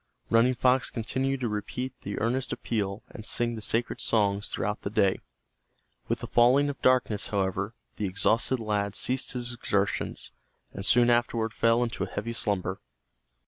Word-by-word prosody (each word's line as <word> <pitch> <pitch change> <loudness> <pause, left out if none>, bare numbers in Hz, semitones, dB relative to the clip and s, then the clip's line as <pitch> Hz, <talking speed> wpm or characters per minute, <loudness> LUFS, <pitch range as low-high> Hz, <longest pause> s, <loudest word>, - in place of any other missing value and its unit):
Running 120 +3 +4
Fox 125 +2 +2
continued 130 +4 -2
to 120 - 0
repeat 120 +4 -4
the 100 - -4
earnest 125 +4 0
appeal 100 -3 -3
and 110 - -9
sing 120 +1 0
the 110 - -6
sacred 115 +3 -1
songs 100 -2 +1
throughout 105 +1 -2
the - - -3
day. 100 -3 +2 0.9
With - - -1
the - - -5
falling 130 +4 +4
of 140 - -13
darkness, 125 -5 +2
however, 100 +2 -1 0.2
the 105 - -1
exhausted 110 +6 +1
lad 105 -2 -1
ceased 130 +1 +2
his 120 -1 -3
exertions, 100 -4 -1 0.4
and 95 - -6
soon 120 +3 +6
afterward 115 -1 +1
fell 115 +1 +3
into 115 - -3
a - - -4
heavy 115 +3 -4
slumber. 95 -4 -1
115 Hz, 160 wpm, -28 LUFS, 100-120 Hz, 0.9 s, soon